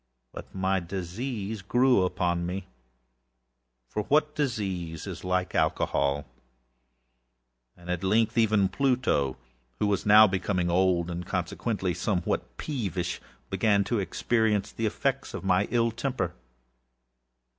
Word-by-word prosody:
But -, -, -10 dB
my 95 Hz, 0 st, +1 dB
disease 100 Hz, +4 st, -4 dB
grew 125 Hz, +3 st, +3 dB
upon 90 Hz, -1 st, 0 dB
meâfor 65 Hz, -, -10 dB
what 150 Hz, +2 st, +3 dB
disease 95 Hz, -, -2 dB
is 90 Hz, -3 st, -7 dB
like 90 Hz, 0 st, -1 dB
Alcohol!âand 70 Hz, +1 st, +1 dB, 1.6 s
at 90 Hz, -1 st, -2 dB
length 110 Hz, +4 st, +2 dB
even 110 Hz, -4 st, +3 dB
Pluto, 125 Hz, -, +1 dB, 0.4 s
who -, -, 0 dB
was 100 Hz, -2 st, +1 dB
now 105 Hz, +1 st, +8 dB
becoming 95 Hz, -2 st, 0 dB
old, 90 Hz, -1 st, +2 dB
and 85 Hz, +1 st, -4 dB
consequently 95 Hz, 0 st, -2 dB
somewhat 85 Hz, -, -2 dB
peevishâeven 100 Hz, -, -3 dB
Pluto -, -, -25 dB, 0.3 s
began 105 Hz, -3 st, +3 dB
to 110 Hz, +3 st, -1 dB
experience 105 Hz, +1 st, 0 dB
the 115 Hz, -, -1 dB
effects 135 Hz, +5 st, -2 dB
of -, -, -6 dB
my 95 Hz, +1 st, +2 dB
ill 115 Hz, -1 st, +2 dB
temper. 115 Hz, -7 st, -2 dB
95 Hz, 115 wpm, -27 LUFS, 85-110 Hz, 1.6 s, now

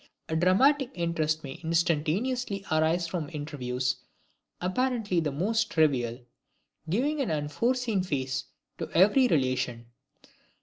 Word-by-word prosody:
A 160 Hz, -, -1 dB
dramatic 250 Hz, -, +4 dB
interest 160 Hz, -2 st, -1 dB
may 135 Hz, +3 st, -8 dB
instantaneously 180 Hz, -, 0 dB
arise 160 Hz, +2 st, +2 dB
from 165 Hz, -3 st, -4 dB
interviews 130 Hz, -5 st, -2 dB, 0.6 s
apparently 215 Hz, -1 st, 0 dB
the 155 Hz, -3 st, -1 dB
most 215 Hz, +10 st, 0 dB
trivial, 130 Hz, -7 st, +1 dB, 0.7 s
giving 280 Hz, -, +1 dB
an 265 Hz, -, -1 dB
unforeseen 205 Hz, -, 0 dB
phase 135 Hz, -6 st, -2 dB, 0.3 s
to -, -, -4 dB
every 210 Hz, +9 st, +6 dB
relation. 130 Hz, -, 0 dB
165 Hz, 105 wpm, -28 LUFS, 145-215 Hz, 0.7 s, every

